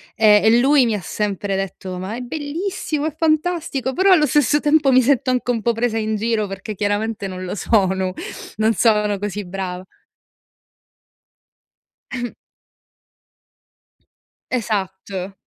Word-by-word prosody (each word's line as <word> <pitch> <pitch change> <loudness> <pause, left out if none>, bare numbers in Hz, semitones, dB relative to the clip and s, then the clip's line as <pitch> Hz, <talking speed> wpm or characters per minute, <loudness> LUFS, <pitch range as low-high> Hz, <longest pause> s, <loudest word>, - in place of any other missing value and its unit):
e 210 -1 +6
e 225 +2 +5
lui 270 0 +5
mi 225 - 0
ha 205 - -2
sempre 200 0 -2
detto: 190 -1 -4
“Ma 190 +4 -5
è - - -5
bellissimo, 310 +3 -3
è 315 - -5
fantastico.” 310 -5 0
Però 380 +2 +3
allo 305 -5 +5
stesso 295 +1 +3
tempo 295 -2 +3
mi 255 - +6
sento 255 0 +2
anche 250 0 -1
un 230 -3 0
po' 235 - +3
presa 225 0 -1
in 220 0 -1
giro, 220 0 0
perché 195 +2 -6
chiaramente 205 +2 -1
non 185 -1 -5
lo 185 - -4
sono, 190 -3 +1 0.4
non 220 +1 +2
sono 210 -2 +2
così 205 +1 -4
brava. 180 0 -5 2.3
Ehm 245 -2 -4 2.2
Esatto. 195 -4 -3
220 Hz, 135 wpm, -20 LUFS, 195-265 Hz, 2.3 s, e